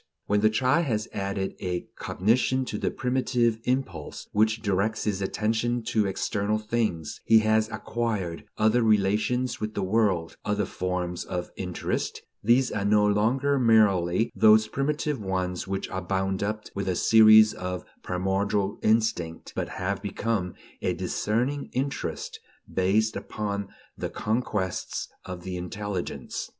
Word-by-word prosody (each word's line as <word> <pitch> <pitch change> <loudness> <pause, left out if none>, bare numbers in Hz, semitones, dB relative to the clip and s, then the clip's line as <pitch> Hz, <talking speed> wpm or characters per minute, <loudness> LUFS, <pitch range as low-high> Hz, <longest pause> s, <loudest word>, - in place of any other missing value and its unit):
When 105 0 +2
the 110 - +5
child 130 +9 +2
has 110 -5 -1
added 100 0 -2
a 90 -2 -2
cognition 125 +6 +1
to - - -4
the - - 0
primitive 125 -3 0
impulse 130 +2 -2
which 110 +1 +2
directs 105 +2 0
his 100 -2 -1
attention 110 +4 0
to 105 -2 +2
external 100 +2 -1
things, 110 -8 -2
he 115 - +6
has 110 0 +2
acquired 110 -8 -3
other 110 +3 +3
relations 110 +4 +2
with 110 0 -3
the 100 - -1
world, 95 -5 +1
other 105 -1 0
forms 90 -1 -3
of 90 -1 -4
interest; 90 -2 -3 0.2
these 120 +4 +4
are 100 - -2
no 105 +1 +4
longer 125 +7 +2
merely 105 -4 +3
those 110 0 +6
primitive 150 +2 -1
ones 95 -2 -2
which 95 0 -2
are 95 - -3
bound 95 +1 -1
up 105 +1 -2
with 100 -1 -3
a 90 - 0
species 110 +1 +7
of 90 0 -5 0.2
primordial 95 +2 -1
instinct, 110 -7 0
but - - -2
have 100 +2 -3
become 100 -2 -2 0.3
a - - 0
discerning 125 +7 -1
interest, 135 +2 -3 0.3
based 105 +4 +1
upon 100 -2 -3 0.3
the - - -4
conquests 105 -5 -2 0.2
of 90 -1 -7
the 90 0 -4
intelligence. 95 +1 -4
105 Hz, 140 wpm, -26 LUFS, 95-115 Hz, 0.3 s, species